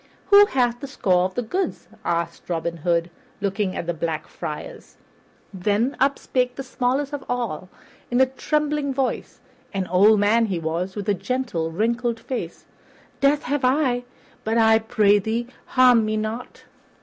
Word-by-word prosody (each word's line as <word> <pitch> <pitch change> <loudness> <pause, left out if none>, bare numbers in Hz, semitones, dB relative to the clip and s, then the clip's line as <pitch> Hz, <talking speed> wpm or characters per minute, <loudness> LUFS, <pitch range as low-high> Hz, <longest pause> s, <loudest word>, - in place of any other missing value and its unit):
"Who 405 0 +9
hath 245 - +1
the 280 - -6
score 185 -9 +2
of 185 - -4
the 245 - -1
goods?" 365 - -3 0.2
asked 170 +1 -2
Robin 170 0 -2
Hood, 170 +1 0 0.3
looking 195 -1 -1
at - - -3
the 175 - -1
Black 160 -1 -3
Friars. 150 - -8 0.6
Then 210 +7 0
up 275 +1 +3
spake 250 -1 -1
the 270 - -5
smallest 265 +2 -1
of 285 - -4
all, 225 -8 -3 0.4
in 245 - +1
a 265 - +7
trembling 295 +1 -1
voice 265 -1 -2 0.3
an 190 -1 0
old 200 +4 +5
man 225 +3 +3
he 190 -4 -2
was, 170 +3 -3
with 205 -1 -5
a 205 - +3
gentle, 200 -6 -2
wrinkled 230 +6 -1
face. 250 +2 -5 0.5
"That 280 +2 +3
have 285 +1 -1
I; 255 -2 +2 0.4
but, 225 +1 0
I 220 -1 +5
pray 210 -2 +3
thee, 225 +4 -2 0.2
harm 250 -3 +5
me 215 0 -1
not." 220 +3 -5
225 Hz, 160 wpm, -23 LUFS, 185-255 Hz, 0.6 s, Who